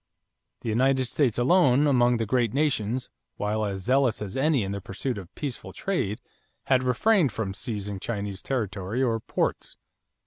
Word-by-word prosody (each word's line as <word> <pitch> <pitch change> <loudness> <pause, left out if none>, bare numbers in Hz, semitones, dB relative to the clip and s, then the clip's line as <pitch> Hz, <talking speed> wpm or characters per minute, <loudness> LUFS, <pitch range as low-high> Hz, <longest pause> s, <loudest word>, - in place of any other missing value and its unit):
The 115 - -3
United 130 +3 +2
States 120 -2 +1
alone 135 0 +4
among 125 -4 +4
the 115 - -1
great 120 +1 +1
nations, 130 -5 0 0.3
while 105 +1 -1
as 100 -2 -3
zealous 130 +2 +2
as 100 -2 -6
any 135 -2 +2
in 95 - -3
the 100 0 -4
pursuit 105 +5 -3
of 95 -1 -11
peaceful 140 -5 -5
trade, 110 - -2 0.4
had 130 -1 +3
refrained 145 - +3
from 105 -3 -3
seizing 105 -3 -4
Chinese 100 -3 -4
territory 105 -1 -2
or 115 -3 +1
ports. - - -2
120 Hz, 160 wpm, -26 LUFS, 105-135 Hz, 0.4 s, alone